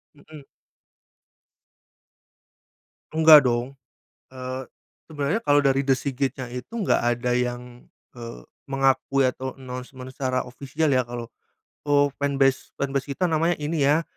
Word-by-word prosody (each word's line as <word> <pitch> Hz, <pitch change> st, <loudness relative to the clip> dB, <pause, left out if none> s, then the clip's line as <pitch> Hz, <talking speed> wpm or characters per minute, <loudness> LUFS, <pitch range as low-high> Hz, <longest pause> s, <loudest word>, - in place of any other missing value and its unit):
Mhm. 145 Hz, -1 st, -14 dB, 2.7 s
Enggak 155 Hz, -3 st, +8 dB
dong, 125 Hz, +3 st, -1 dB, 0.6 s
eee, 130 Hz, 0 st, -6 dB, 0.4 s
sebenarnya 150 Hz, +7 st, -1 dB
kalau 145 Hz, 0 st, +5 dB
dari 135 Hz, 0 st, +3 dB
The 135 Hz, -, +5 dB
S.I.G.I.T 135 Hz, 0 st, -2 dB
itu 125 Hz, -, -8 dB
enggak 215 Hz, -5 st, +2 dB
ada 120 Hz, +1 st, 0 dB
yang, 125 Hz, 0 st, -3 dB, 0.3 s
eee, 115 Hz, -, -8 dB, 0.3 s
mengakui 135 Hz, 0 st, +1 dB
atau 130 Hz, +1 st, -4 dB
announcement 125 Hz, 0 st, -8 dB
secara 130 Hz, -2 st, -1 dB
official 140 Hz, +4 st, -2 dB
ya 130 Hz, -1 st, +3 dB
kalau, 120 Hz, -1 st, -6 dB, 0.6 s
"Oh 145 Hz, 0 st, +3 dB
fanbase 135 Hz, -1 st, +1 dB
fanbase 140 Hz, 0 st, -2 dB
kita 180 Hz, -, 0 dB
namanya 165 Hz, +2 st, +1 dB
ini 150 Hz, +1 st, -1 dB
ya," 150 Hz, +3 st, +4 dB
135 Hz, 120 wpm, -24 LUFS, 125-145 Hz, 2.7 s, Enggak